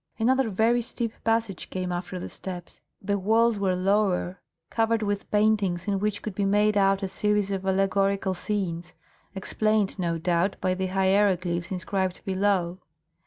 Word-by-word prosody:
Another 260 +2 +2
very 225 +4 +2
steep 230 -1 -3
passage 225 -4 -1
came 185 -1 -3
after 180 +1 -4
the - - -5
steps. 180 -2 -7 0.2
The 200 +1 0
walls 225 +2 +3
were 190 -2 +1
lower, 185 -1 +1 0.3
covered 225 -1 +1
with 205 0 -2
paintings, 205 -4 +1
in 200 -1 +1
which 210 0 -2
could 215 - -4
be 200 - -1
made 205 +2 +3
out 195 0 +3
a - - 0
series 210 +1 0
of 195 -1 -3
allegorical 195 0 +1
scenes, 180 -3 -3 0.4
explained, 210 +1 0
no 170 -2 0
doubt, 175 +3 +1
by 185 0 +1
the 190 +1 -2
hieroglyphs 190 -2 +1
inscribed 185 0 -2
below. 190 -2 0
195 Hz, 155 wpm, -26 LUFS, 185-210 Hz, 0.4 s, walls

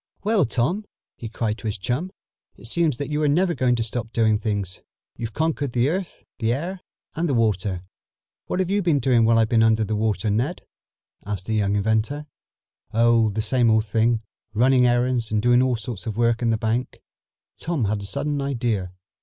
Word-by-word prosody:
"Well, 210 -5 +3
Tom," 155 - -1 0.3
he 115 - -7
cried 110 0 -2
to 110 - -5
his 105 - -2
chum, 125 - -2 0.4
"it 100 - -15
seems 155 +2 +1
that 145 +1 -4
you 150 +1 0
are 150 - +2
never 170 +5 +2
going 125 -5 +2
to 115 - -1
stop 115 0 -4
doing 110 -3 +2
things. 100 -5 -3 0.3
You've 115 -1 -6
conquered 150 -5 -1
the 120 +1 +2
air, 180 +4 -1 0.3
the 115 0 +1
earth 180 +6 -5 0.3
and 165 +1 -1
the 135 - +1
water." 100 -5 0 0.6
"What - - -2
have 185 0 0
you 205 +1 +2
been 170 -5 +2
doing 120 -3 +3
while 115 0 +4
I've 110 -1 +3
been 115 -1 +3
under 110 -1 +3
water, 105 -1 0
Ned?" 125 - -1 0.6
asked 100 -2 -4
the 110 - -2
young 100 -2 +1
inventor. 110 +8 0 0.7
"Oh, 115 -1 +4
the 110 +1 -2
same 120 +1 +3
old 110 0 +3
thing. 115 +1 +1 0.3
Running 125 +2 +4
errands 120 -1 +1
and 110 - +1
doing 120 +3 +4
all 130 -1 +2
sorts 115 -1 -6
of 110 -1 -4
work 115 0 +2
in 120 - +1
the 110 - +2
bank." 115 +3 -2 0.6
Tom 160 -8 -1
had 105 0 -1
a 100 - -6
sudden 145 +6 -2
idea. 115 -9 -2
115 Hz, 195 wpm, -23 LUFS, 110-140 Hz, 0.7 s, while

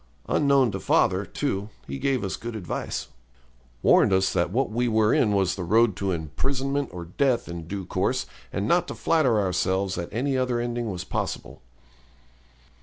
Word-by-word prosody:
Unknown 140 -5 +3
to 95 - -4
father, - - +2
too, 100 +2 -2 0.2
he 70 0 -5
gave 135 -5 0
us 95 - -2
good 120 0 -6
advice, 95 -6 -4 0.7
warned - - +5
us 95 0 +2
that 85 0 +1
what 120 +4 0
we 120 +2 0
were 110 -1 +3
in 105 - +3
was 100 -3 +2
the 95 - -4
road 110 +3 +3
to 100 - -1
imprisonment 135 - -2
or 85 -1 -7
death 125 +8 0
in 85 -2 -7
due 95 0 -4
course, - - 0 0.3
and 100 +1 -2
not 175 +5 +3
to - - -5
flatter 135 -10 +2
ourselves 95 0 0
that 85 -2 -4
any 135 +5 0
other 125 -2 0
ending 120 -1 -2
was 90 -3 -4
possible. - - -4
110 Hz, 175 wpm, -25 LUFS, 95-125 Hz, 0.7 s, warned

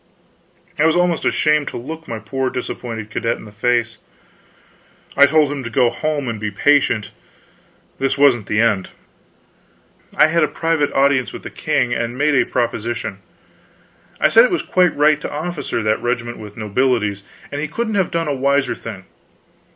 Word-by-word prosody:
I 155 - +4
was 160 - +2
almost 175 -1 +1
ashamed 150 -1 +2
to - - -5
look 160 +7 -8
my 115 - -4
poor 130 +5 -3
disappointed 115 -4 -6
cadet 115 +1 -1
in - - -12
the 105 - -12
face. 115 +1 0 1.2
I 140 - +7
told 150 -1 +3
him 140 -2 -4
to 120 - -5
go 120 0 +2
home 150 -3 -2
and 115 -2 -3
be 105 0 -2
patient, 115 0 +2 0.9
this 135 +1 0
wasn't 130 -7 +3
the 105 - 0
end. 110 -5 +1 1.3
I - - +6
had 165 +1 +2
a - - +3
private 165 -3 0
audience 135 -4 +2
with - - -8
the - - -7
king, 120 -1 0
and 120 +1 -3
made 150 +2 +2
a 135 - +3
proposition. 115 -4 -2 1.0
I - - +4
said 230 - +7
it 250 - +3
was 355 - -1
quite 180 -3 +2
right 150 0 +3
to - - -5
officer 155 -6 -3
that 110 0 +1
regiment 120 -1 -2
with 105 -1 -11
nobilities, 105 -2 0 0.3
and 145 - -3
he 155 - -2
couldn't 220 +7 -3
have 195 -3 +1
done 165 -1 -2
a 145 - 0
wiser 140 0 +1
thing. 100 -5 -9
130 Hz, 175 wpm, -19 LUFS, 115-150 Hz, 1.3 s, I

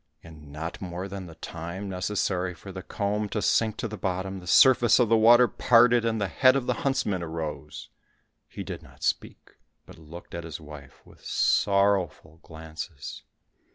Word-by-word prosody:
In 75 -3 -13
not 80 +3 -6
more 90 0 -5
than 95 -2 -7
the 85 - -12
time 85 +4 -7
necessary 95 -1 -2
for 95 +4 -11
the 95 0 -7
comb 105 +2 -2
to 105 - -2
sink 110 +2 +1
to - - -3
the 110 -1 -8
bottom, 95 0 -3
the 90 - -13
surface 120 +4 +6
of 120 -4 +3
the 115 - +5
water 120 +2 +6
parted, 120 +2 +4
and 115 -1 0
the 100 - 0
head 130 +6 +4
of 135 -3 -1
the - - +1
huntsman 105 -9 0
arose. 80 -2 -6 0.6
He - - -7
did - - -7
not - - -16
speak, - - -3 0.3
but - - -15
looked 80 +2 -12
at 85 0 -5
his 80 -1 -7
wife 75 -3 -13
with - - -19
sorrowful 100 -5 +1
glances. 80 -2 -9
95 Hz, 175 wpm, -26 LUFS, 85-110 Hz, 0.6 s, surface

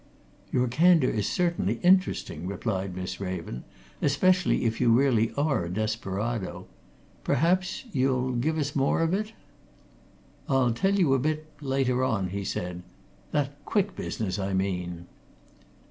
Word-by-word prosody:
"Your 125 0 +2
candour 160 +2 +4
is 105 -2 -1
certainly 170 - 0
interesting," 180 - +2
replied 100 -2 -3
Miss 90 0 -5
Raven. 90 -10 -5 0.4
"Especially 180 +2 +2
if 110 +1 0
you 120 - +4
really 115 -2 +3
are 140 - +1
a - - -5
desperado. 110 +1 -3 0.6
Perhaps 185 - +1
you'll 130 -3 +1
give 140 +6 0
us 145 -2 -2
more 135 +3 +2
of 165 +1 +1
it?" 215 +3 -2 1.2
"I'll 130 -3 +3
tell 195 +12 +1
you 170 -9 +3
a 135 - +3
bit 155 +3 -1 0.2
later 135 -2 +1
on," 105 -8 0
he 100 +2 -4
said. 90 -2 -4 0.5
"That 145 0 -2
Quick 205 -2 0
business, 100 -2 -3
I 95 0 -1
mean." 90 -3 -2
125 Hz, 135 wpm, -27 LUFS, 100-155 Hz, 1.2 s, candour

